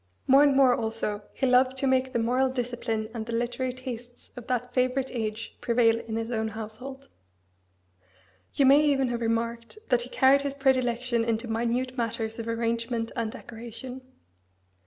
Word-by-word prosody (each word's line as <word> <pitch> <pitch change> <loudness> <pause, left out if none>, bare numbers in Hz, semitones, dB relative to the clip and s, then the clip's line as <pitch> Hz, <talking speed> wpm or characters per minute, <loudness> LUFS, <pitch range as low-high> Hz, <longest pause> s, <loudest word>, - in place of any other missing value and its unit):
More 270 +2 +6
and 285 -2 +5
more 265 -2 +6
also 220 -2 -2
he 270 - -1
loved 255 +1 +4
to 275 - 0
make 260 0 +2
the - - 0
moral 250 +3 +2
discipline 240 -3 -2
and 230 -2 -4
the 235 - -4
literary 245 +2 -1
tastes 245 -1 -9
of 245 -1 -9
that 250 0 -2
favourite 255 +1 +1
age 220 -2 -4
prevail 230 -1 +3
in 230 -1 -6
his 225 +1 -3
own 220 -1 -1
household. 225 +6 -7 1.5
You 275 - +4
may 280 +3 +7
even 270 -3 +2
have 240 -1 -2
remarked 230 - -2
that 245 -1 +3
he 245 - -6
carried 270 +2 +4
his 280 0 -3
predilection 255 -3 +1
into 230 +1 -1
minute 240 +3 -1
matters 230 -1 -2
of 230 - -5
arrangement 230 0 -1
and 225 -2 -2
decoration. 245 +3 -9
240 Hz, 165 wpm, -27 LUFS, 230-260 Hz, 1.5 s, may